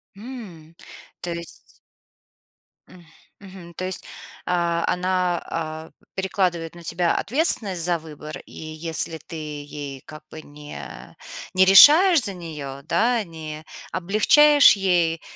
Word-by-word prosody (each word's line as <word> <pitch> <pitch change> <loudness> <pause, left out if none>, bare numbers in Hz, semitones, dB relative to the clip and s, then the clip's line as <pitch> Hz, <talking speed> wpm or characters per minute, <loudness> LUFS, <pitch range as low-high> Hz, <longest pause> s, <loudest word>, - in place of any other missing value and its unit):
М, 195 -9 -11 0.5
то 175 - -5
есть 170 -1 -8 1.4
М. 175 -2 -16 0.3
Мгм, 185 -3 -13
то 185 - -5
есть, 185 0 -3 0.4
а, 170 -1 0
она, 180 -1 0
а, 160 -1 -5 0.2
перекладывает 180 -4 -2
на 170 - -12
тебя 170 +1 0
ответственность 215 - +1
за 175 0 +1
выбор, 155 -1 -10
и - - -19
если 160 +1 -3
ты 160 +2 -12
ей 145 -3 -7
как 155 -1 -12
бы 155 - -10
не 145 0 -11 0.4
не 190 0 +5
решаешь 305 - +8
за 200 - -1
неё, 150 -6 -8
да, 230 - +1
не 160 -3 -9 0.3
облегчаешь 250 - +5
ей, 175 -4 0
170 Hz, 120 wpm, -22 LUFS, 160-190 Hz, 1.4 s, решаешь